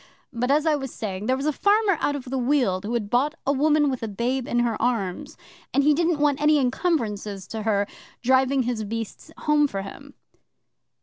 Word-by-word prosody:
But, 245 Hz, +2 st, -1 dB
as 295 Hz, +3 st, +3 dB
I 315 Hz, -, +3 dB
was 270 Hz, -3 st, -5 dB
saying, 200 Hz, -1 st, -5 dB
there 260 Hz, +1 st, +2 dB
was 275 Hz, -, -4 dB
a 305 Hz, -, +1 dB
farmer 410 Hz, +3 st, +3 dB
out 290 Hz, -, +1 dB
of 280 Hz, -, -5 dB
the 265 Hz, +1 st, -3 dB
Weald 240 Hz, -8 st, +1 dB
who 230 Hz, +3 st, -2 dB
had 210 Hz, -3 st, -3 dB
bought 280 Hz, +6 st, +2 dB
a 280 Hz, -, +2 dB
woman 295 Hz, +1 st, +3 dB
with 260 Hz, -3 st, -2 dB
a 225 Hz, -, -3 dB
babe 240 Hz, +5 st, -2 dB
in 240 Hz, -, +1 dB
her 235 Hz, -2 st, 0 dB
arms, 220 Hz, -7 st, -2 dB, 0.4 s
and 280 Hz, -, +4 dB
he 300 Hz, +1 st, +5 dB
didn't 335 Hz, +1 st, +1 dB
want 290 Hz, -1 st, +1 dB
any 300 Hz, 0 st, +5 dB
encumbrances 225 Hz, -, -1 dB
to 220 Hz, -, -4 dB
her 205 Hz, -2 st, +1 dB, 0.4 s
driving 260 Hz, +1 st, +3 dB
his 235 Hz, -2 st, -2 dB
beasts 225 Hz, +7 st, -6 dB
home 300 Hz, -1 st, +3 dB
for 195 Hz, -7 st, -4 dB
him. 195 Hz, -, -11 dB
255 Hz, 205 wpm, -24 LUFS, 225-295 Hz, 0.4 s, he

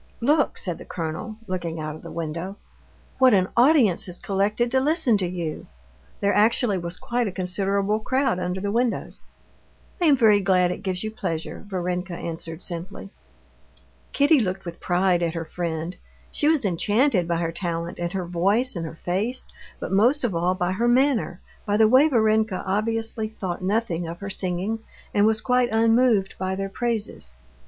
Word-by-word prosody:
"Look," 290 Hz, +4 st, +2 dB
said 175 Hz, -3 st, -4 dB
the -, -, -8 dB
colonel, 165 Hz, +6 st, -5 dB
looking 175 Hz, -4 st, -4 dB
out 155 Hz, -1 st, -4 dB
of -, -, -12 dB
the -, -, -9 dB
window, 170 Hz, +4 st, -5 dB, 0.6 s
"what 260 Hz, -4 st, +6 dB
an 185 Hz, -1 st, +2 dB
audience 240 Hz, -, +4 dB
has 180 Hz, -1 st, -7 dB
collected 210 Hz, +5 st, 0 dB
to 265 Hz, -, +3 dB
listen 290 Hz, -4 st, +3 dB
to 185 Hz, -, 0 dB
you." 170 Hz, -3 st, -5 dB, 0.5 s
There 200 Hz, 0 st, +2 dB
actually 215 Hz, -1 st, +2 dB
was 170 Hz, +1 st, -5 dB
quite 240 Hz, -1 st, -1 dB
a -, -, -3 dB
considerable 195 Hz, +3 st, +1 dB
crowd 260 Hz, -3 st, 0 dB
under 180 Hz, +1 st, -2 dB
the 200 Hz, +1 st, -2 dB
windows. 235 Hz, +1 st, -1 dB, 0.8 s
"I -, -, +3 dB
am 285 Hz, -3 st, +5 dB
very 215 Hz, -4 st, +5 dB
glad 185 Hz, -2 st, +2 dB
it -, -, -5 dB
gives 185 Hz, 0 st, -3 dB
you 215 Hz, -, -3 dB
pleasure," 165 Hz, -7 st, -4 dB
Varenka 180 Hz, -1 st, -3 dB
answered 165 Hz, 0 st, -6 dB
simply. 185 Hz, +3 st, -6 dB, 1.0 s
Kitty 290 Hz, +1 st, +4 dB
looked 190 Hz, -3 st, -2 dB
with 170 Hz, -1 st, -7 dB
pride 180 Hz, 0 st, +1 dB
at 170 Hz, -1 st, -1 dB
her 165 Hz, -1 st, -3 dB
friend. 165 Hz, +1 st, -4 dB, 0.4 s
She 295 Hz, -, 0 dB
was 310 Hz, -7 st, +3 dB
enchanted 205 Hz, -, +2 dB
by 170 Hz, -1 st, 0 dB
her 165 Hz, -1 st, -1 dB
talent, 170 Hz, -1 st, -4 dB
and 175 Hz, 0 st, -2 dB
her 190 Hz, -2 st, -2 dB
voice, 200 Hz, +9 st, +1 dB
and 165 Hz, -2 st, -3 dB
her 160 Hz, -, -10 dB
face, 210 Hz, +8 st, -2 dB, 0.3 s
but -, -, -5 dB
most 240 Hz, +9 st, +3 dB
of 235 Hz, -6 st, 0 dB
all 175 Hz, +2 st, +1 dB
by 180 Hz, 0 st, -1 dB
her 230 Hz, +6 st, 0 dB
manner, 240 Hz, -7 st, +2 dB, 0.2 s
by 205 Hz, 0 st, 0 dB
the 220 Hz, 0 st, +6 dB
way 260 Hz, +7 st, +6 dB
Varenka 220 Hz, -5 st, +2 dB
obviously 220 Hz, +3 st, -1 dB
thought 185 Hz, -5 st, -5 dB
nothing 185 Hz, -4 st, -1 dB
of 170 Hz, +1 st, -7 dB
her 200 Hz, 0 st, -4 dB
singing 190 Hz, +4 st, -2 dB, 0.3 s
and 205 Hz, +1 st, +4 dB
was 220 Hz, -1 st, +1 dB
quite 250 Hz, +1 st, +2 dB
unmoved 225 Hz, -2 st, +3 dB
by 190 Hz, 0 st, -1 dB
their 195 Hz, 0 st, -3 dB
praises. 215 Hz, -, -3 dB
195 Hz, 180 wpm, -24 LUFS, 175-225 Hz, 1.0 s, what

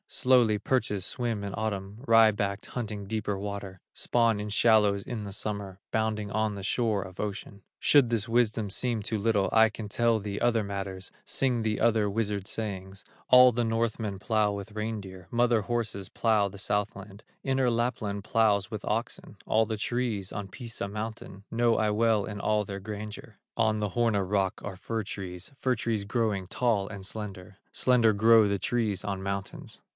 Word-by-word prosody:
Slowly 125 Hz, -5 st, +4 dB
perches 105 Hz, -4 st, 0 dB
swim 120 Hz, -4 st, -2 dB
in 100 Hz, -1 st, -4 dB
Autumn, 105 Hz, +1 st, -4 dB
Wry 115 Hz, -2 st, +6 dB
backed, 100 Hz, -1 st, -3 dB
hunting 105 Hz, -4 st, -5 dB
deeper 105 Hz, -1 st, -2 dB
water, 100 Hz, -2 st, -6 dB
Spawn 115 Hz, -3 st, +1 dB
in 105 Hz, -, -4 dB
shallows 105 Hz, -2 st, +4 dB
in 115 Hz, -4 st, -5 dB
the 100 Hz, -, -6 dB
summer, 100 Hz, -2 st, -4 dB
Bounding 110 Hz, -2 st, -1 dB
on 110 Hz, -1 st, 0 dB
the 100 Hz, -, -7 dB
shore 105 Hz, -1 st, +1 dB
of 95 Hz, -1 st, -12 dB
ocean. 100 Hz, -1 st, -5 dB, 0.2 s
Should 140 Hz, -5 st, +5 dB
this 115 Hz, -2 st, 0 dB
wisdom 115 Hz, -3 st, +1 dB
seem 115 Hz, +1 st, 0 dB
too 110 Hz, +2 st, -2 dB
little, 105 Hz, -2 st, +2 dB
I 110 Hz, 0 st, +6 dB
can 110 Hz, 0 st, -7 dB
tell 115 Hz, +2 st, +2 dB
thee 100 Hz, -1 st, -4 dB
other 115 Hz, -2 st, +2 dB
matters, 95 Hz, -2 st, -5 dB
Sing 125 Hz, -3 st, 0 dB
thee 110 Hz, -1 st, -1 dB
other 110 Hz, -3 st, +3 dB
wizard 100 Hz, -2 st, -1 dB
sayings: 95 Hz, -2 st, -5 dB, 0.2 s
All 125 Hz, 0 st, +9 dB
the 120 Hz, +1 st, 0 dB
Northmen 115 Hz, -3 st, -1 dB
plow 105 Hz, 0 st, +1 dB
with 100 Hz, +1 st, -6 dB
reindeer, 105 Hz, -4 st, -5 dB
Mother 120 Hz, -1 st, +3 dB
horses 110 Hz, -4 st, -3 dB
plow 110 Hz, -3 st, +2 dB
the 100 Hz, -, -11 dB
Southland, 100 Hz, +1 st, -3 dB, 0.2 s
Inner 130 Hz, -2 st, +2 dB
Lapland 110 Hz, -4 st, -1 dB
plows 105 Hz, -2 st, +2 dB
with 110 Hz, -2 st, -6 dB
oxen; 110 Hz, -1 st, -3 dB
All 110 Hz, +1 st, +3 dB
the 110 Hz, 0 st, -3 dB
trees 115 Hz, -4 st, -2 dB
on 100 Hz, -2 st, -5 dB
Pisa 120 Hz, -2 st, -5 dB
mountain, 105 Hz, -2 st, -6 dB
Know 115 Hz, 0 st, +2 dB
I 110 Hz, -, +2 dB
well 110 Hz, -1 st, +2 dB
in 105 Hz, -2 st, -6 dB
all 105 Hz, -1 st, +1 dB
their 100 Hz, 0 st, -6 dB
grandeur; 105 Hz, +1 st, -7 dB, 0.2 s
On 110 Hz, -2 st, +2 dB
the 105 Hz, -1 st, -1 dB
Horna 110 Hz, -1 st, +1 dB
rock 100 Hz, -2 st, 0 dB
are 100 Hz, -2 st, -5 dB
fir 110 Hz, +4 st, -3 dB
trees, 95 Hz, -1 st, -7 dB
Fir 130 Hz, -1 st, 0 dB
trees 115 Hz, -2 st, -1 dB
growing 100 Hz, -3 st, -1 dB
tall 105 Hz, -2 st, 0 dB
and 100 Hz, -3 st, -7 dB
slender; 100 Hz, -2 st, -7 dB
Slender 120 Hz, -3 st, +4 dB
grow 110 Hz, 0 st, +5 dB
the 100 Hz, -1 st, 0 dB
trees 110 Hz, -4 st, -1 dB
on 100 Hz, -2 st, -3 dB
mountains. 100 Hz, 0 st, -5 dB
105 Hz, 175 wpm, -28 LUFS, 100-115 Hz, 0.2 s, All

